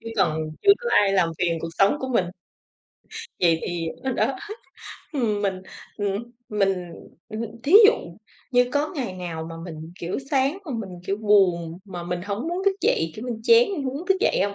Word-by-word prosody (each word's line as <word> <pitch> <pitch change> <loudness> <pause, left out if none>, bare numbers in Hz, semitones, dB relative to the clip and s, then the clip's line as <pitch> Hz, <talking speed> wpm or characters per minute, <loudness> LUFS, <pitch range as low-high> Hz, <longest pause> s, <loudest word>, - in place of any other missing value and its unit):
Chứ - - -15
còn 155 -2 +2 0.2
chưa 400 - +8
có 480 - -4
ai 200 -1 +4
làm 185 -4 +3
phiền 170 -2 +1
cuộc 165 - -4
sống 200 +8 +4
của 260 - -3
mình. 230 -7 +2 1.2
Vậy 165 -2 +3
thì, 170 -2 -2
ờ, - - -10
ờ, 265 - 0
đó 270 - 0 0.8
Ừm, 215 -7 0
mình, 190 -2 -1 0.3
ừm, 205 0 -1 0.3
mình, 195 -4 0 0.4
ừm, 215 0 -5
hừm, 230 -2 -4
thí 290 - -1
dụ 445 - +7 0.6
như 245 -1 +3
có 290 +1 0
ngày 250 -9 -3
nào 170 -3 -5
mà - - -7
mình, 160 -1 -8
kiểu, 175 +7 -3
sáng 275 +5 +2
mà 290 - -5
mình, 195 -6 -6
kiểu, 195 - 0
buồn, 185 -6 +2
mà 180 -4 -7
mình 175 0 -3
hổng 205 - -3
muốn 355 +3 -2
thức 395 -1 +3
dậy, 165 0 +1
kiểu 220 - -6
như, 245 - -2
chán 465 - +7
mình 310 - -3
hông 260 0 -2
muốn 335 +6 -6
thức 385 - +3
dậy - - +2
hông? 200 0 -3
200 Hz, 210 wpm, -24 LUFS, 175-260 Hz, 1.2 s, chưa